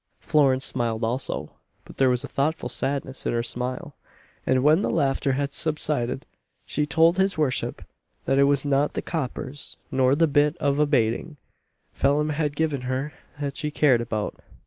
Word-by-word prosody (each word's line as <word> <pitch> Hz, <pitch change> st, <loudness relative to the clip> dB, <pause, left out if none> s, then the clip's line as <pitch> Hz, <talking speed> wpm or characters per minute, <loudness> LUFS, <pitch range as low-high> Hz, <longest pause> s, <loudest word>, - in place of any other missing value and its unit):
Florence 135 Hz, -4 st, +3 dB
smiled 115 Hz, -2 st, -1 dB
also; 120 Hz, +4 st, -2 dB, 0.3 s
but -, -, -14 dB
there 135 Hz, -1 st, +4 dB
was 125 Hz, -1 st, 0 dB
a -, -, -5 dB
thoughtful 150 Hz, +4 st, -1 dB
sadness 135 Hz, -1 st, -2 dB
in -, -, 0 dB
her 115 Hz, 0 st, 0 dB
smile; 125 Hz, +4 st, -4 dB, 0.5 s
and, 130 Hz, 0 st, +3 dB
when 155 Hz, +3 st, +5 dB
the -, -, 0 dB
laughter 135 Hz, -2 st, +1 dB
had 140 Hz, +1 st, -2 dB
subsided, 150 Hz, -4 st, -1 dB, 0.4 s
she 150 Hz, 0 st, -1 dB
told 165 Hz, +4 st, +4 dB
his 190 Hz, -1 st, +2 dB
worship, 150 Hz, -5 st, -1 dB, 0.4 s
that 135 Hz, +1 st, +2 dB
it 140 Hz, -, +6 dB
was 140 Hz, 0 st, +2 dB
not 140 Hz, +1 st, +2 dB
the -, -, -2 dB
"coppers," 145 Hz, -2 st, -4 dB
nor 130 Hz, 0 st, +3 dB
the 165 Hz, +3 st, +4 dB
bit 150 Hz, +1 st, +2 dB
of 140 Hz, -2 st, 0 dB
a 150 Hz, -, +4 dB
"bating" 140 Hz, +4 st, 0 dB, 0.6 s
Phelim 145 Hz, +2 st, +2 dB
had 150 Hz, -1 st, -1 dB
given 150 Hz, -3 st, 0 dB
her, 130 Hz, +4 st, -3 dB, 0.3 s
that 140 Hz, -2 st, -3 dB
she 150 Hz, -1 st, -1 dB
cared 145 Hz, -5 st, +3 dB
about. 110 Hz, -3 st, -3 dB
140 Hz, 170 wpm, -25 LUFS, 130-150 Hz, 0.6 s, it